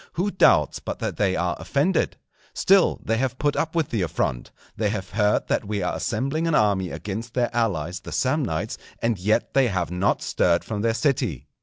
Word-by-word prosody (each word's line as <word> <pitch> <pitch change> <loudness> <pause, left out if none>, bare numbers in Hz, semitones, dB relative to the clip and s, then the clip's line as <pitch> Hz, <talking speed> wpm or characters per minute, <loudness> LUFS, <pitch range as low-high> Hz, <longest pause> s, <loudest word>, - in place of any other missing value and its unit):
Who 190 +4 -1
doubts 75 - +4
but - - -5
that - - -4
they 95 -3 +1
are 90 -1 0
offended? 150 +7 0 0.4
Still 195 -1 +4
they 115 - 0
have 130 +1 -1
put 145 +1 0
up 160 +1 -1
with 160 -4 +1
the 110 - -1
affront. 70 -7 -2 0.3
They 105 -2 0
have 100 -3 -4
heard 105 0 +1
that - - 0
we 100 -2 -2
are 90 - -1
assembling 135 - -1
an 165 - +2
army 100 -4 +2
against 110 +6 -6
their 120 -1 0
allies 90 -7 -1
the - - -10
Samnites; - - -1 0.2
and 115 -4 0
yet 105 +4 +1
they 135 -2 +4
have 90 -5 -2
not 90 +3 0
stirred 85 -1 +2
from 105 -2 -4
their 115 0 +1
city. 125 - 0
110 Hz, 195 wpm, -24 LUFS, 95-135 Hz, 0.4 s, doubts